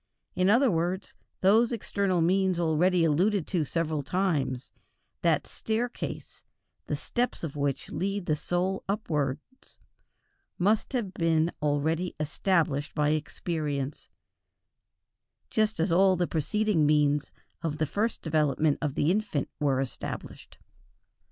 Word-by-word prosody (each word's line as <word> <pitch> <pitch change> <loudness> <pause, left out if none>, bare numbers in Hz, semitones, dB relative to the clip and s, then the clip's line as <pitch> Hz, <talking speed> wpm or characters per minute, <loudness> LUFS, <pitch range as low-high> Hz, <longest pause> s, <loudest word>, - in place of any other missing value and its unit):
In 185 +1 +2
other 240 +3 +5
words, 175 +3 -1 0.3
those 220 +5 +5
external 200 -5 0
means 185 +1 +2
already 170 +2 +3
alluded 175 +4 +2
to 175 -5 +1
several 155 -1 -1
times, 140 -6 -1 0.5
that - - +2
staircase, 230 +2 -4 0.5
the - - -1
steps 245 -5 -2
of 150 -4 -4
which 140 -2 -2
lead 195 0 -2
the 155 - +1
soul 180 +4 -1
upwards, 160 - -3 0.8
must 210 +8 +1
have 220 -7 -2
been 165 -1 +2
already 155 +4 0
established 155 -2 0
by 150 -1 +2
experience, 150 -2 -3 1.4
just 215 -3 +1
as 165 +2 +1
all 190 +2 +5
the 180 0 +1
preceding 170 +1 +1
means 150 -1 +2 0.3
of 155 -2 -2
the 155 - +1
first 215 +9 -2
development 155 -2 +1
of 150 -4 -2
the 150 - +2
infant 200 -8 -1
were 140 -3 +2
established. 135 -2 -6
165 Hz, 120 wpm, -28 LUFS, 150-195 Hz, 1.4 s, other